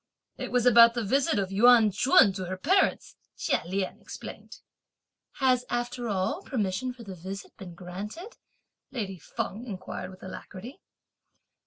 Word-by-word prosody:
"It - - -6
was 250 -1 +2
about 235 -1 +7
the 235 - -1
visit 260 +1 +1
(of 195 -1 -1
Yuan 225 +1 +6
Ch'un) 200 -1 +5
to 185 -1 -5
her 185 +1 -4
parents," 375 - +1 0.2
Chia - - 0
Lien 190 +1 -3
explained. - - -10 0.8
"Has 255 -2 +2
after 240 0 -2
all 200 - -1
permission 245 - -2
for 245 -1 -12
the 195 -3 -8
visit 190 +3 -8
been 180 -4 -10
granted?" 205 - -8 0.5
lady 200 -8 -5
Feng 205 +7 -5
inquired 185 -2 -6
with 185 0 -14
alacrity. 200 - -9
210 Hz, 145 wpm, -28 LUFS, 190-250 Hz, 0.8 s, about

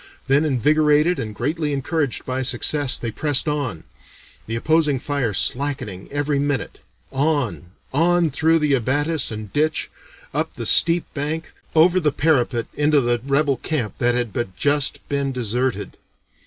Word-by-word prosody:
Then, 140 +3 +3
invigorated 150 +4 +3
and 110 -2 -5
greatly 150 +5 -1
encouraged 140 0 -2
by 130 0 -2
success, 130 +2 0
they 115 - -4
pressed 145 +3 +1
on 140 - -2 0.6
the 115 - -3
opposing 150 +3 +2
fire 135 -3 -1
slackening 125 -5 -1
every 145 0 0
minute, 145 -1 -2 0.3
on, 135 - -1 0.2
on, 170 +2 +3
through 160 +4 +3
the 150 -3 +1
abatis 145 +5 0
and 110 -2 -7
ditch, 155 +1 0 0.4
up - - -2
the - - -5
steep 170 +1 +4
bank, 155 +2 -3 0.2
over 175 +3 +5
the 155 -4 +1
parapet 130 -6 +1
into 150 0 +3
the 120 -2 0
rebel 140 0 +1
camp 135 -10 -3
that 120 0 +2
had 120 -3 -2
but 120 -7 -3
just 145 -1 0
been 140 -1 -1
deserted. 125 +1 -2
140 Hz, 145 wpm, -21 LUFS, 125-155 Hz, 0.6 s, over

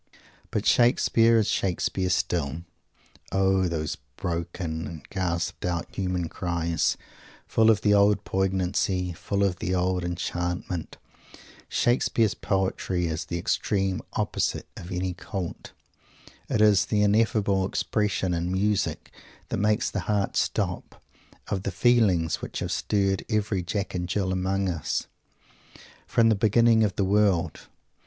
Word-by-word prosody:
But - - -2
Shakespeare 115 -1 +4
is 110 - +2
Shakespeare 95 0 0
still. 85 -3 -1 0.7
O 95 -1 +2
those 80 -3 -3 0.2
broken 85 -2 -3
and 80 -3 -9
gasped 85 -3 -2
out 85 -1 -2
human 90 -3 -1
cries, 85 -1 -1 0.5
full 110 0 +3
of 110 -2 +4
the 105 - +3
old 100 0 +4
poignancy, 95 -1 0
full 100 +4 -2
of 95 -3 +1
the 90 +2 -1
old 90 0 0
enchantment! 90 0 -3 0.7
Shakespeare's 115 -3 +2
poetry 95 -2 -1
is 80 -1 -3
the 85 - -3
extreme 95 0 0
opposite - - -1
of 85 - -9
any 90 0 -2
"cult." 90 0 -6 0.8
It 105 - +1
is 105 -3 +5
the 105 -1 +1
ineffable 105 -2 +2
expression, 100 -3 -1
in 85 +1 -1
music 100 +1 0 0.4
that - - -1
makes 105 +2 +1
the - - -2
heart 100 -2 0
stop, - - -2 0.5
of 95 - -1
the - - -2
feelings 105 -10 +2
which - - -6
have - - -3
stirred 95 -2 0
every 105 -3 0
Jack 95 +3 -3
and 90 -1 -3
Jill 95 0 0
among 95 +1 0
us, 80 -4 -2 1.0
from 115 -1 +4
the 110 - +4
beginning 110 +2 +4
of 100 -4 0
the 100 - +1
world! 95 -4 +1
95 Hz, 135 wpm, -26 LUFS, 90-105 Hz, 1.0 s, is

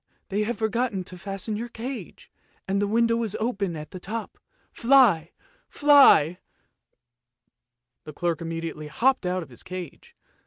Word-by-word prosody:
they 205 +1 0
have 230 +3 -2
forgotten 220 -2 -1
to 180 - -10
fasten 195 +3 -4
your 235 +3 -5
cage, 245 +3 -8 0.4
and 195 +1 0
the 205 - +1
window 230 +2 +2
is 220 -3 -3
open 200 -6 -2
at 150 -1 -8
the 185 - -8
top. 220 +4 -6 0.3
Fly! 230 - +4 0.4
fly! 275 - +6 0.9
" 120 0 -57
The 155 - -9
clerk 170 +1 -2
immediately 165 -2 -5
hopped 245 - +1
out 180 0 -1
of 160 - -15
his 120 - -9
cage. 180 -4 -9
195 Hz, 150 wpm, -25 LUFS, 165-230 Hz, 0.9 s, fly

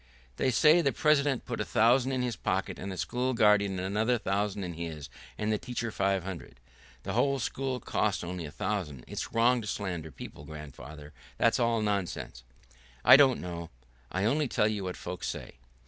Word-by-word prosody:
"They 130 - +2
say 155 +7 +5
the 140 - +2
president 145 -1 +2
put 120 - -3
a - - +1
thousand 125 +4 +3
in 130 -1 0
his 120 -3 -1
pocket, - - -2
and 100 - -5
the 95 - -6
school 125 +5 -1
guardian 105 -3 +4
another 105 +6 +1
thousand 100 -1 -1
in 90 -1 -4
his, 80 -4 -6 0.3
and 105 0 -1
the 105 - 0
teacher 120 -2 -4
five 95 -2 0
hundred." 85 -9 -8 0.4
"The - - -4
whole 140 0 +2
school 135 +1 -2
only 125 - -7
cost 105 -4 0
a 85 -3 -5
thousand. 75 -7 -3
It's - - -5
wrong 120 +2 +3
to 105 - -7
slander 90 -7 -3
people, 70 - -10
grandfather. 75 0 -10 0.2
That's - - +3
all 115 -2 +2
nonsense." 100 -11 -3 0.6
"I - - +11
don't 135 -2 +5
know,... 85 -2 -6 0.4
I 95 +2 0
only 145 +6 +2
tell 105 - +2
you 105 -2 -2
what 90 - -4
folks - - -5
say." - - -6
105 Hz, 185 wpm, -29 LUFS, 90-125 Hz, 0.6 s, I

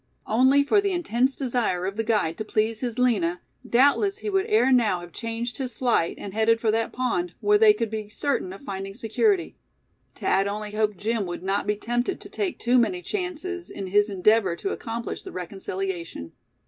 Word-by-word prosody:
Only 260 +5 +4
for 405 +8 +3
the 400 -1 0
intense 265 -6 +1
desire 235 -9 -1
of 195 +1 -3
the 225 - -1
guide 210 -8 +1
to - - -1
please 215 +1 0
his 240 -2 -3
Lina, 195 -9 +2 0.3
doubtless 285 +11 +3
he 415 +1 -4
would 385 +1 +1
ere 430 - +3
now 220 -8 +3
have 175 0 -11
changed 230 +4 -4
his 255 -4 -4
flight, 235 -10 +1
and 195 - -7
headed 225 +1 +3
for 225 -2 +2
that 225 +1 0
pond, 300 +8 -1
where 415 0 +4
they 435 -1 +8
could 230 - -2
be 215 -1 -4
certain 210 -4 -1
of 195 - -10
finding 195 0 -5
security. 360 - 0 0.6
Thad 195 +1 +1
only 210 +1 -4
hoped 210 -2 0
Jim 215 0 -1
would 175 0 -6
not 195 +1 -1
be 210 - +2
tempted 240 - -2
to - - -12
take 385 -4 -2
too 245 +1 +3
many 360 +10 0
chances, 365 -2 -4
in 195 - -6
his 205 +3 +2
endeavor 195 -1 +3
to 390 - -3
accomplish 230 0 -5
the - - -9
reconciliation. 180 - -5
225 Hz, 195 wpm, -25 LUFS, 200-275 Hz, 0.6 s, they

